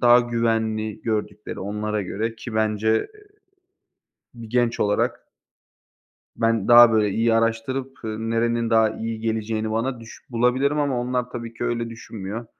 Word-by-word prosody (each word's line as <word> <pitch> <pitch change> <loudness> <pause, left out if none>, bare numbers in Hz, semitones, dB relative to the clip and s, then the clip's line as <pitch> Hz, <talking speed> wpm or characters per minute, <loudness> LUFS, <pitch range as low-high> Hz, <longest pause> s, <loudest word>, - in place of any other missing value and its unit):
daha 120 0 +7
güvenli 115 -2 -1
gördükleri 105 -2 -3
onlara 105 +1 -2
göre, 110 +5 -3
ki 115 0 -8
bence, 110 0 0 0.3
eee, 420 -1 -20 1.0
bir 115 -2 -10
genç 120 0 +1
olarak 105 0 +1 1.2
ben 115 -3 +1
daha, 120 -1 +9
böyle, 110 -2 +3
iyi 115 +3 +2
araştırıp, 115 +4 0
eee, 110 - -3
nerenin 115 +1 0
daha 110 -1 +4
iyi 115 0 -5
geleceğini 110 -1 -2
bana 115 +3 -1
düş 115 -1 -12
bulabilirim 130 +5 +1
ama 140 -4 0
onlar 125 0 -2
tabii 115 -2 -7
ki - - -5
öyle 115 -1 -1
düşünmüyor. 110 -1 -7
115 Hz, 145 wpm, -23 LUFS, 110-120 Hz, 1.2 s, daha